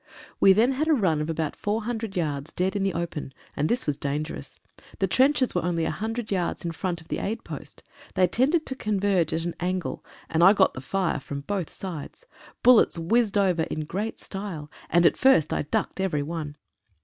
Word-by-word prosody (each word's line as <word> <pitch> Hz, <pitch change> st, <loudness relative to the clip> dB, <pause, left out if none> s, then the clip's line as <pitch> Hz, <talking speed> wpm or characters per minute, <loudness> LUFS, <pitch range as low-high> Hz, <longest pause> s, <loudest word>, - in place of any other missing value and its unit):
We 195 Hz, -, +7 dB
then 225 Hz, +7 st, +4 dB
had 285 Hz, +4 st, -1 dB
a 315 Hz, -, +5 dB
run 170 Hz, -, +1 dB
of 150 Hz, -, -3 dB
about 160 Hz, -2 st, -2 dB
400 220 Hz, -1 st, -3 dB
yards 150 Hz, -3 st, -2 dB
dead 185 Hz, +2 st, 0 dB
in 200 Hz, -, 0 dB
the 195 Hz, -1 st, 0 dB
open, 160 Hz, -5 st, -4 dB, 0.2 s
and 150 Hz, +2 st, 0 dB
this 245 Hz, +2 st, +1 dB
was 145 Hz, -2 st, -1 dB
dangerous. 145 Hz, +2 st, -4 dB, 0.4 s
The 195 Hz, -, +2 dB
trenches 260 Hz, +6 st, +3 dB
were 175 Hz, -, 0 dB
only 170 Hz, -1 st, 0 dB
100 225 Hz, +5 st, -3 dB
yards 180 Hz, -3 st, -1 dB
in 170 Hz, -, -1 dB
front 170 Hz, 0 st, -3 dB
of 160 Hz, -, -18 dB
the -, -, -3 dB
aid 220 Hz, +3 st, -3 dB
post. -, -, -9 dB, 0.3 s
They 185 Hz, -1 st, +5 dB
tended 275 Hz, -, +2 dB
to 265 Hz, -, -4 dB
converge 200 Hz, -6 st, +1 dB
at 165 Hz, +1 st, -1 dB
an 175 Hz, -, -2 dB
angle, 180 Hz, 0 st, -2 dB, 0.2 s
and 165 Hz, +1 st, +2 dB
I 190 Hz, +3 st, +9 dB
got 195 Hz, -2 st, +3 dB
the 130 Hz, -, -7 dB
fire 185 Hz, +5 st, -1 dB
from 140 Hz, +1 st, -6 dB
both 185 Hz, +2 st, -3 dB
sides. 185 Hz, -, -7 dB, 0.4 s
Bullets 245 Hz, -7 st, +6 dB
whizzed 210 Hz, +5 st, +2 dB
over 185 Hz, -4 st, +2 dB
in 160 Hz, -, -2 dB
great 195 Hz, +9 st, -4 dB
style, 190 Hz, -7 st, -6 dB, 0.2 s
and 175 Hz, +1 st, +4 dB
at -, -, +4 dB
first 260 Hz, -, +4 dB
I -, -, 0 dB
ducked 195 Hz, +7 st, -2 dB
at -, -, +1 dB
every 150 Hz, -6 st, -1 dB
one. 155 Hz, -1 st, -5 dB
185 Hz, 205 wpm, -26 LUFS, 160-215 Hz, 0.4 s, I